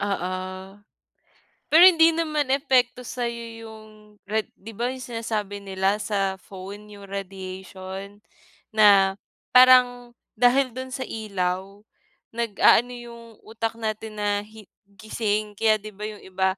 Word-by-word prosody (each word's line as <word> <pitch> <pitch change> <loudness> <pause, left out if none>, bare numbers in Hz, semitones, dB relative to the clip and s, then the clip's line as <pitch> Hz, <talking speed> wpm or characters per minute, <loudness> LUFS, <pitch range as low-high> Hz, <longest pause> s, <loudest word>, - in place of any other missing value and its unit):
Oo 190 -3 -2 1.4
pero 330 +4 +8
hindi 330 -3 +7
naman 310 -4 -1
epekto 255 -2 +1
sa'yo 235 -1 -4 0.2
yung 220 -1 -11 0.4
rad 215 +1 -2
'di 225 +3 -11
ba 240 +4 -2
yung 260 0 -6
sinasabi 215 -4 -4
nila 195 +1 -1
sa 195 -2 -1
phone 200 +2 -10
yung 200 -1 -12
radiation 190 0 -8 0.6
na 200 -3 +6 0.4
parang 250 -1 +5 0.2
dahil 250 +2 +3
do'n 260 +1 -6
sa 260 +1 -5
ilaw, 190 -4 -2 0.7
nag-aano 235 +1 +3
yung 240 -1 -10 0.2
utak 225 +1 -4
natin 220 -1 -5
na 205 -1 0
hi 215 0 -14 0.2
gising 215 0 -3
kaya 215 +1 +2
'di 215 0 -11
ba 210 +2 -7
yung 210 -1 -11
iba, 190 0 -1
215 Hz, 125 wpm, -24 LUFS, 200-245 Hz, 1.4 s, pero